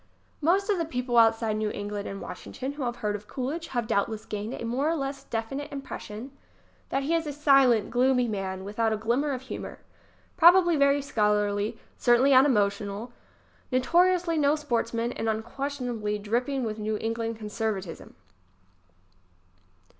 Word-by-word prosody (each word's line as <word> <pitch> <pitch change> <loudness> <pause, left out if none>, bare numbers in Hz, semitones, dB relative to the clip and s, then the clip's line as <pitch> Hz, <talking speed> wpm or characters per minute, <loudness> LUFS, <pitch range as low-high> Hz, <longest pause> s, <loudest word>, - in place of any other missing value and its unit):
Most 375 +6 +2
of 390 - +1
the 335 - 0
people 250 -5 -3
outside 225 -1 +3
New 215 0 -1
England 205 0 -5
and 195 - -6
Washington 265 +6 -6
who 290 +1 -8
have 240 0 -2
heard 205 0 +1
of 210 0 -8
Coolidge 295 +6 -4
have 240 -2 -2
doubtless 220 0 -1
gained 210 +2 -4
a - - -6
more 260 +6 0
or 330 - +1
less 275 -2 -4
definite 270 +6 -4
impression 265 -3 -7 0.6
chat 270 - 0
he 310 +5 0
is 330 -2 0
a - - -2
silent, 275 -7 +4
gloomy 250 0 +3
man 190 -3 -3
without 220 +3 -1
a 220 - 0
glimmer 240 +7 0
of 260 -1 -4
humor, 265 - -7 0.6
probably 345 0 +7
very 280 -1 +3
scholarly, 210 -4 0 0.2
certainly 250 +3 +4
un 265 +2 +7
emotional, 205 0 0 0.6
notoriously 340 +5 +3
no 290 0 +3
sportsman 235 -5 -1
and 225 - -4
unques 220 +2 -3 0.2
tionably 220 -5 -2
dripping 245 +6 -1
with 220 -1 -3
New 215 0 -1
England 225 +1 -2
conservatism. 210 -4 -4
240 Hz, 155 wpm, -27 LUFS, 215-280 Hz, 0.6 s, probably